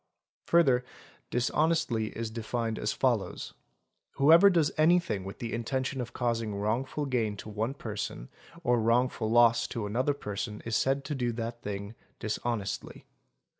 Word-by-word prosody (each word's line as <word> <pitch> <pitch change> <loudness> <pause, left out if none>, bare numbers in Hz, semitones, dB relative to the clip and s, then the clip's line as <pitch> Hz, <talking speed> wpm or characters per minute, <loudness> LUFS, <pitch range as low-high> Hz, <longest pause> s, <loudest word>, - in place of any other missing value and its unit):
Further 135 -8 +4 0.5
"dishonestly"' 130 -2 +1
is 115 -1 -3
defined 115 0 -3
as - - 0
follows: - - -1 0.6
"whoever 165 +8 +7
does 165 -5 +2
anything 160 - +3
with 95 +1 -7
the 115 -1 -5
intention 130 +3 -2
of 120 - -6
causing 115 -4 -1
wrongful 120 +8 -1
gain 115 -6 -1
to 110 - -8
one 110 +5 -2
person 105 - -5 0.3
or 120 -1 +3
wrongful 115 0 +1
loss 115 0 +5
to 115 -3 -4
another 130 +7 0
person 105 -3 -5
is 115 -1 -1
said 135 +3 +1
to 150 - -3
do 125 -3 -1
that 115 +1 -5
thing 100 +1 -5 0.2
dishonestly". 110 -1 -3
120 Hz, 140 wpm, -29 LUFS, 110-135 Hz, 0.6 s, whoever